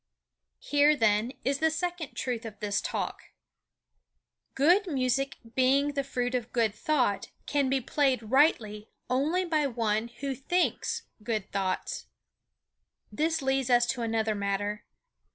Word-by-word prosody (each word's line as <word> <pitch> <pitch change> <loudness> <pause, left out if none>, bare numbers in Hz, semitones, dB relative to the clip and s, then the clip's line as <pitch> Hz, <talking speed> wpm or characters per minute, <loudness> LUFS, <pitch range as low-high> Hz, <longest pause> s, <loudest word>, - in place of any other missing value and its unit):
Here, 295 +1 +3
then, 225 -1 +2
is 275 +1 +1
the 320 - +3
second 345 -1 -3
truth 245 -3 -3
of 220 -2 -8
this 205 -1 0
Talk: - - -4 1.3
Good 350 +9 +4
music 270 -2 0 0.2
being 275 +3 +3
the 280 -1 -1
fruit 250 -2 -2
of 245 -2 -2
good 230 -4 +1
thought 245 -3 0 0.2
can 280 -3 +1
be 270 0 +1
played 265 -1 +1
rightly 220 -7 +2 0.2
only 310 +9 +1
by 310 -4 +1
one 225 -3 0
who 270 +4 -5
thinks 350 +8 -1 0.2
good 215 -2 -3
thoughts. 190 -2 -2 1.0
This 320 -1 0
leads 265 -1 +1
us 240 -1 +5
to 245 0 -1
another 225 -1 0
matter. 205 +1 -2
255 Hz, 135 wpm, -29 LUFS, 225-285 Hz, 1.3 s, us